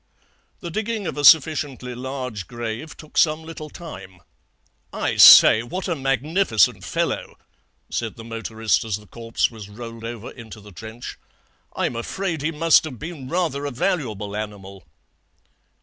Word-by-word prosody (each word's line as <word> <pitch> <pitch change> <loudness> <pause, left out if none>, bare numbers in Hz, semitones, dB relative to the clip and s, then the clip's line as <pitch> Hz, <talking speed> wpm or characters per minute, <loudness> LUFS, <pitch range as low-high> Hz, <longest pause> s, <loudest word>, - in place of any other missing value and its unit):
"The 170 - -6
digging 215 +2 -3
of - - -3
a 145 - -3
sufficiently 145 -4 +4
large 125 -5 -5
grave 120 +5 -6
took 155 - -3
some 155 0 +3
little 160 -1 -8
time. 95 - -10 0.7
'I - - -2
say, 110 - +10
what 180 +12 -5
a 175 - 0
magnificent 135 - +1
fellow,' - - -2 0.5
said 115 -2 -3
the 115 - -10
motorist 115 -1 -1
as 110 -3 -2
the 105 +1 -10
corpse 115 +3 -2
was 105 -3 -10
rolled 115 +1 -9
over 115 -1 -6
into 110 -3 -11
the 105 0 -14
trench. 110 +6 -9 0.6
'I'm - - -1
afraid 165 +7 -3
he 155 - 0
must 165 0 +4
have 135 -6 -7
been 150 -2 -8
rather 160 -5 -1
a - - -4
valuable 115 - -2
animal.' 100 -4 -7
125 Hz, 150 wpm, -22 LUFS, 110-155 Hz, 0.7 s, say